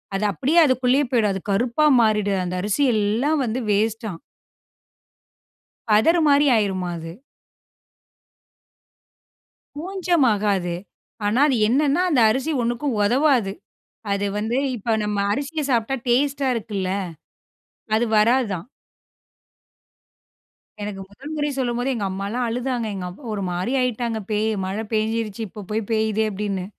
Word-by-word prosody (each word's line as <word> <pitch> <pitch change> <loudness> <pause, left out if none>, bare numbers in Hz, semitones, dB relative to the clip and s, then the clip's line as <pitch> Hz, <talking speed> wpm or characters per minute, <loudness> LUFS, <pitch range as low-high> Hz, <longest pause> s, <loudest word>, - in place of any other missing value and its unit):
அது 205 - -1
அப்படியே 285 - +2
அதுக்குள்ளயே 260 +1 +2
போய்டும். 220 -5 +2
அது 190 - -4
கருப்பா 240 +8 +1 0.2
மாறிடும். 205 -3 +1
அந்த 180 +1 -3
அரிசி 210 +8 0
எல்லாம் 230 +9 +1
வந்து 235 +3 -2
வேஸ்ட்டாம். 215 -3 -1 1.7
பதரு 270 +12 +4
மாரி 285 +1 +5
ஆயிருமா, 190 -4 0
அது. 165 0 -7 2.6
பூஞ்சம் 350 -1 0
ஆகாது. 195 -4 0 0.5
ஆனா, 220 +7 +2
அது 270 - +2
என்னன்னா, 285 +7 +2
அந்த 265 -7 +3
அரிசி 265 +7 0
ஒண்ணுக்கும் 240 +2 -1
உதவாது. 245 -2 +2 0.6
அது 200 0 0
வந்து 225 +4 -1 0.2
இப்ப 225 0 -1
நம்ம 210 -1 -2 0.2
அரிசிய 290 +4 -3
சாப்பிட்டா 235 +3 +1
டேஸ்ட்டா 275 +2 +1
இருக்குல்ல. 200 -4 -3 1.1
அது 235 +2 +2
வராதாம். 215 -5 +2 2.2
எனக்கு 205 -2 -5
முதல் 275 +9 -10
முறை 295 0 -1
சொல்லும்போதே, 245 +1 -1
எங்க 205 -3 -2
அம்மால்லாம் 200 +6 -3
அழுதாங்க. 245 0 -2
எங்கப் 180 -1 -6
ஒரு 205 -2 -3
மாரி 180 +9 -2
ஆயிட்டாங்க. 235 -2 -1
பேய் 215 +1 +1 0.2
"மழை 200 +4 -3
பேய்ஞ்சிடுச்சு. 220 0 -1
இப்ப 205 0 -10
போய் 215 -1 -2
பேயிதே!" 220 0 +1
அப்படின்னு. 195 -2 -3
225 Hz, 120 wpm, -22 LUFS, 205-265 Hz, 2.6 s, மாரி